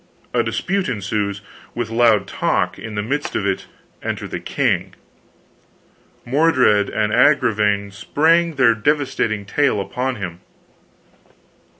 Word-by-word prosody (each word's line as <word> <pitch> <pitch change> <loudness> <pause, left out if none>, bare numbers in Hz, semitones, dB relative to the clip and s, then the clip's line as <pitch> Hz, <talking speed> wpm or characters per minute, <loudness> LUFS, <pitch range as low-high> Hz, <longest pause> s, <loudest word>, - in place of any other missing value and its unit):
A - - +3
dispute 195 -4 -1
ensues, 100 -2 -2 0.3
with 120 -2 -3
loud 115 -2 +3
talk; - - -1
in 110 -1 -7
the 105 - -1
midst 145 +6 -3
of 100 - -1
it 95 -1 -2 0.3
enter - - -4
the - - -5
king. - - -1 1.3
Mordred 130 -7 +3
and 110 0 -1
Agravaine 105 -6 +3
spring 160 +10 +2
their 125 -4 +5
devastating 115 -4 0
tale 140 +1 +1
upon 125 +7 -2
him. 90 -6 -6
115 Hz, 115 wpm, -20 LUFS, 105-140 Hz, 1.3 s, their